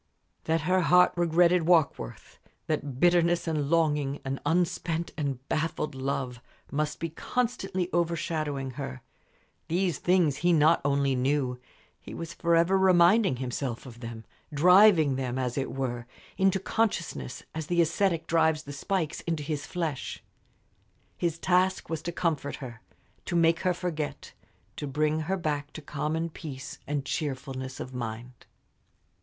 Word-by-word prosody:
That 160 Hz, 0 st, +1 dB
her 185 Hz, +4 st, +2 dB
heart 180 Hz, +1 st, +5 dB
regretted 175 Hz, 0 st, +3 dB
Warkworth, 155 Hz, -, +1 dB, 0.3 s
that 145 Hz, -4 st, -3 dB
bitterness 175 Hz, 0 st, +3 dB
and 150 Hz, -3 st, -1 dB
longing, 150 Hz, -4 st, +1 dB
an 135 Hz, 0 st, -2 dB
unspent 170 Hz, 0 st, 0 dB
and 135 Hz, -3 st, -3 dB
baffled 155 Hz, -1 st, -1 dB
love, 130 Hz, -2 st, -3 dB, 0.3 s
must 150 Hz, +2 st, -1 dB
be 165 Hz, -, -2 dB
constantly 195 Hz, -3 st, -2 dB
overshadowing 155 Hz, -5 st, -1 dB
her 65 Hz, 0 st, -6 dB, 0.6 s
these 175 Hz, +1 st, 0 dB
things 175 Hz, -6 st, +2 dB
he 175 Hz, +3 st, +2 dB
not 160 Hz, +1 st, +4 dB
only 140 Hz, -1 st, +2 dB
knew, 130 Hz, -1 st, 0 dB, 0.4 s
he -, -, -10 dB
was 165 Hz, 0 st, -6 dB
forever 170 Hz, +3 st, +3 dB
reminding 185 Hz, -, +5 dB
himself 125 Hz, 0 st, -4 dB
of 120 Hz, -2 st, -11 dB
them, 115 Hz, -2 st, -8 dB, 0.3 s
driving 170 Hz, -2 st, +6 dB
them, 130 Hz, -1 st, -2 dB
as 125 Hz, -2 st, -1 dB
it 135 Hz, -, -2 dB
were, 125 Hz, -3 st, -3 dB, 0.3 s
into 190 Hz, 0 st, +2 dB
consciousness, 190 Hz, -, -2 dB
as 160 Hz, -2 st, -4 dB
the 175 Hz, -1 st, +1 dB
ascetic 170 Hz, 0 st, +2 dB
drives 160 Hz, -2 st, +2 dB
the 145 Hz, -, -8 dB
spikes 165 Hz, +2 st, -2 dB
into 165 Hz, -3 st, -1 dB
his 145 Hz, -1 st, -3 dB
flesh. 165 Hz, -6 st, -4 dB, 0.9 s
His 170 Hz, -2 st, -1 dB
task 185 Hz, +1 st, +1 dB
was 160 Hz, -2 st, -2 dB
to 170 Hz, -, -4 dB
comfort 160 Hz, -5 st, -1 dB
her, 120 Hz, -5 st, -9 dB, 0.4 s
to -, -, -3 dB
make 165 Hz, 0 st, +4 dB
her 185 Hz, -, +1 dB
forget, 160 Hz, -4 st, -4 dB, 0.4 s
to 145 Hz, -, -4 dB
bring 150 Hz, +3 st, +1 dB
her 180 Hz, +5 st, -1 dB
back 150 Hz, -4 st, -2 dB
to 155 Hz, -, -7 dB
common 155 Hz, +3 st, -2 dB
peace 140 Hz, -4 st, -8 dB
and 145 Hz, -1 st, -2 dB
cheerfulness 135 Hz, -3 st, -4 dB
of 130 Hz, -, -6 dB
mind. 120 Hz, 0 st, -6 dB
155 Hz, 140 wpm, -28 LUFS, 135-175 Hz, 0.9 s, driving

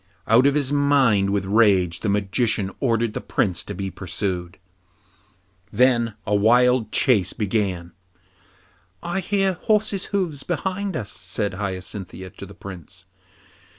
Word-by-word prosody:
Out 120 Hz, +5 st, +5 dB
of 140 Hz, -, +2 dB
his 145 Hz, -1 st, +1 dB
mind 135 Hz, -9 st, +3 dB
with 100 Hz, -1 st, 0 dB
rage, 95 Hz, -5 st, +3 dB
the 105 Hz, -, -2 dB
Magician 100 Hz, 0 st, 0 dB
ordered 115 Hz, -3 st, 0 dB
the -, -, -4 dB
Prince 90 Hz, -5 st, -1 dB
to -, -, -6 dB
be 95 Hz, +1 st, -4 dB
pursued. 90 Hz, -1 st, -4 dB, 1.1 s
Then 120 Hz, -1 st, +2 dB
a 105 Hz, -, -1 dB
wild 120 Hz, +2 st, +3 dB
chase 100 Hz, -8 st, +2 dB
began. 95 Hz, -5 st, -2 dB, 1.1 s
'I 175 Hz, +2 st, -2 dB
hear 195 Hz, 0 st, +1 dB
horses' 210 Hz, +2 st, 0 dB
hoofs 180 Hz, -8 st, -2 dB
behind 190 Hz, +2 st, -3 dB
us,' 105 Hz, -4 st, -5 dB
said 100 Hz, +2 st, -3 dB
Hyacinthia 95 Hz, -1 st, -5 dB
to 100 Hz, -, -10 dB
the 100 Hz, -, -13 dB
Prince. 95 Hz, -1 st, -10 dB
105 Hz, 130 wpm, -23 LUFS, 95-135 Hz, 1.1 s, Out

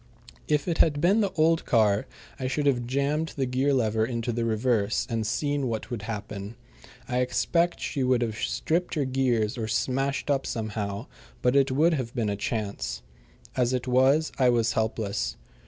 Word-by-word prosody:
If 150 Hz, +1 st, +1 dB
it 170 Hz, -2 st, -1 dB
had 145 Hz, -2 st, +4 dB
been 190 Hz, +8 st, +4 dB
the 200 Hz, -3 st, 0 dB
old 165 Hz, +1 st, +3 dB
car 105 Hz, -4 st, +2 dB, 0.3 s
I 130 Hz, -, -2 dB
should 145 Hz, +3 st, -1 dB
have 125 Hz, -4 st, +1 dB
jammed 140 Hz, +5 st, 0 dB
the 135 Hz, -, 0 dB
gear 130 Hz, +3 st, +1 dB
lever 110 Hz, -4 st, +2 dB
into 115 Hz, 0 st, -2 dB
the 115 Hz, 0 st, -1 dB
reverse, 110 Hz, -1 st, +1 dB
and 110 Hz, -2 st, -1 dB
seen 145 Hz, +2 st, 0 dB
what 115 Hz, +1 st, -4 dB
would 120 Hz, -4 st, -3 dB
happen. 105 Hz, -1 st, -6 dB, 0.5 s
I 125 Hz, -2 st, 0 dB
expect 170 Hz, +7 st, +1 dB
she 140 Hz, -, -3 dB
would 125 Hz, -1 st, +2 dB
have 110 Hz, -2 st, -2 dB
stripped 170 Hz, +10 st, -1 dB
her 145 Hz, -3 st, +1 dB
gears 125 Hz, -3 st, 0 dB
or 110 Hz, -, -2 dB
smashed 135 Hz, +5 st, 0 dB
up 135 Hz, -1 st, 0 dB
somehow, 105 Hz, -1 st, -3 dB, 0.4 s
but 125 Hz, +2 st, +3 dB
it 140 Hz, 0 st, +4 dB
would 160 Hz, +6 st, +3 dB
have 130 Hz, -5 st, -3 dB
been 115 Hz, -4 st, 0 dB
a 100 Hz, -, -1 dB
chance. 100 Hz, -, -3 dB, 0.5 s
As 125 Hz, 0 st, +1 dB
it 125 Hz, 0 st, -2 dB
was, 135 Hz, +5 st, +3 dB
I 130 Hz, -2 st, +5 dB
was 115 Hz, -1 st, +2 dB
helpless. 105 Hz, -, -1 dB
125 Hz, 180 wpm, -27 LUFS, 110-140 Hz, 0.5 s, I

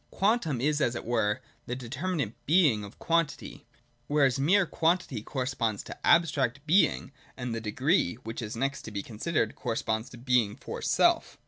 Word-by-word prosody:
Quantum 195 Hz, -, +1 dB
is, 150 Hz, +3 st, +1 dB
as 120 Hz, -3 st, +1 dB
it -, -, -5 dB
were, 110 Hz, -3 st, 0 dB, 0.3 s
the 125 Hz, -, -2 dB
determinate 135 Hz, -, -3 dB
Being 150 Hz, -, +4 dB
of 100 Hz, -, -10 dB
quantity: 165 Hz, -3 st, -1 dB, 0.4 s
whereas 140 Hz, -3 st, +2 dB
mere 185 Hz, +8 st, +4 dB
quantity 165 Hz, -, 0 dB
corresponds 125 Hz, -4 st, -2 dB
to -, -, -9 dB
abstract 140 Hz, -5 st, +3 dB
Being, 155 Hz, -, +3 dB, 0.3 s
and 125 Hz, -1 st, -4 dB
the 115 Hz, -, -3 dB
Degree, 130 Hz, -, +1 dB
which 115 Hz, +2 st, -5 dB
is 110 Hz, -1 st, -5 dB
next 135 Hz, +2 st, -1 dB
to 110 Hz, -, -7 dB
be 100 Hz, -1 st, -4 dB
considered, 125 Hz, +9 st, -1 dB
corresponds 115 Hz, -1 st, -2 dB
to 120 Hz, -, -12 dB
Being 120 Hz, -4 st, +1 dB
for -, -, -7 dB
self. -, -, +2 dB
130 Hz, 160 wpm, -28 LUFS, 115-155 Hz, 0.4 s, Being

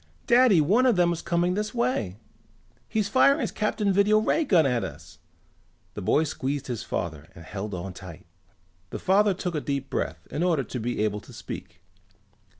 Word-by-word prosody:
"Daddy, 240 Hz, -6 st, +5 dB
one 215 Hz, -, +3 dB
of 240 Hz, -, +4 dB
them 175 Hz, -1 st, +3 dB
is 170 Hz, -, -5 dB
coming 175 Hz, +1 st, +1 dB
this 210 Hz, +3 st, -3 dB
way! 235 Hz, -, -1 dB, 0.7 s
He's 215 Hz, -2 st, 0 dB
firing 275 Hz, +6 st, +4 dB
his 230 Hz, -, -2 dB
Captain 210 Hz, -1 st, 0 dB
Video 200 Hz, +2 st, +4 dB
ray 220 Hz, +9 st, +2 dB
gun 180 Hz, -, +4 dB
at 125 Hz, -3 st, +1 dB
us!" -, -, -9 dB, 0.7 s
They -, -, -6 dB
boy 150 Hz, +11 st, +2 dB
squeezed 140 Hz, -1 st, -3 dB
his 120 Hz, -4 st, -4 dB
father 80 Hz, -2 st, -4 dB
and 85 Hz, -, -12 dB
held 100 Hz, +3 st, -5 dB
on 90 Hz, +1 st, -6 dB
tight. 90 Hz, -2 st, -11 dB, 0.6 s
The -, -, -5 dB
father 200 Hz, +1 st, +3 dB
took 180 Hz, -1 st, -3 dB
a 150 Hz, -, -2 dB
deep 140 Hz, -1 st, -3 dB
breath -, -, -3 dB
in 150 Hz, -, -3 dB
order 170 Hz, -6 st, +2 dB
to 125 Hz, +2 st, -6 dB
be 120 Hz, -1 st, -2 dB
able 105 Hz, -1 st, -1 dB
to -, -, -15 dB
speak. 85 Hz, 0 st, -9 dB
170 Hz, 185 wpm, -26 LUFS, -, 0.7 s, Daddy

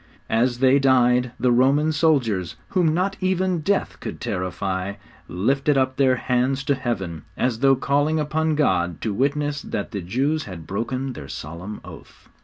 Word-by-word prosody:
As 120 Hz, +2 st, +2 dB
they 135 Hz, +2 st, +4 dB
died 125 Hz, -2 st, +3 dB
the 125 Hz, -, +3 dB
Roman 135 Hz, +6 st, +3 dB
soldiers, 130 Hz, -, +1 dB
whom 175 Hz, -5 st, +2 dB
not 185 Hz, +4 st, 0 dB
even 185 Hz, -1 st, +1 dB
death 195 Hz, +5 st, -1 dB
could -, -, -6 dB
terrify, 95 Hz, -1 st, -3 dB, 0.3 s
lifted 135 Hz, +10 st, +1 dB
up 130 Hz, 0 st, +1 dB
their 130 Hz, -2 st, +4 dB
hands 130 Hz, +2 st, 0 dB
to 140 Hz, -, +2 dB
Heaven, 95 Hz, -, -3 dB, 0.2 s
as 125 Hz, -3 st, 0 dB
though 135 Hz, +1 st, +5 dB
calling 145 Hz, +4 st, +1 dB
upon 155 Hz, +1 st, 0 dB
God 90 Hz, -, +1 dB
to 110 Hz, -, -1 dB
witness 145 Hz, +4 st, 0 dB
that 100 Hz, -, -4 dB
the 100 Hz, -4 st, -4 dB
Jews 135 Hz, -, -1 dB
had 85 Hz, -5 st, -8 dB
broken 130 Hz, +8 st, -3 dB
their 70 Hz, -, -9 dB
solemn 85 Hz, +10 st, -7 dB
oath. -, -, -14 dB
130 Hz, 160 wpm, -23 LUFS, 105-145 Hz, 0.3 s, though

